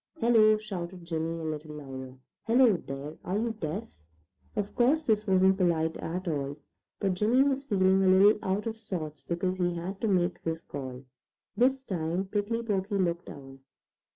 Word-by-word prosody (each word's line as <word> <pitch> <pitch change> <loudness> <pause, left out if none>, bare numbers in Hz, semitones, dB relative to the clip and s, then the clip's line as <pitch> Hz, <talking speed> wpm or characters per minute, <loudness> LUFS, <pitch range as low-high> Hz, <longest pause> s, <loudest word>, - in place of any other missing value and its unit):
"Hello!" 220 -3 +5
shouted 185 -4 -6
Jimmy 165 0 -2
a 165 - -6
little 155 -1 -5
louder. 130 -3 -8 0.3
"Hello, 235 -2 +5
there! 145 -1 -7
Are 185 +3 -1
you 230 +2 0
deaf?" 210 +2 -5 0.6
Of 205 -1 -2
course 275 +6 +3
this 215 -5 +1
wasn't 190 0 +4
polite 160 -3 +1
at 180 +3 -4
all, 145 -3 -2 0.4
but 195 -2 +1
Jimmy 220 +8 +3
was 275 0 0
feeling 190 -5 +3
a - - +3
little 195 +3 +6
out 195 +2 -1
of 225 -1 -3
sorts 160 -9 -5
because 185 +2 -2
he 175 -1 +1
had 170 0 -5
had 195 +1 -6
to 225 - +1
make 180 -3 +1
this 165 0 -3
call. 130 -2 -7 0.5
This 265 +2 +2
time 175 -1 -2
Prickly 210 +4 -1
Porky 200 -2 -1
looked 170 -2 -1
down. 135 -1 -10
185 Hz, 175 wpm, -29 LUFS, 160-215 Hz, 0.6 s, little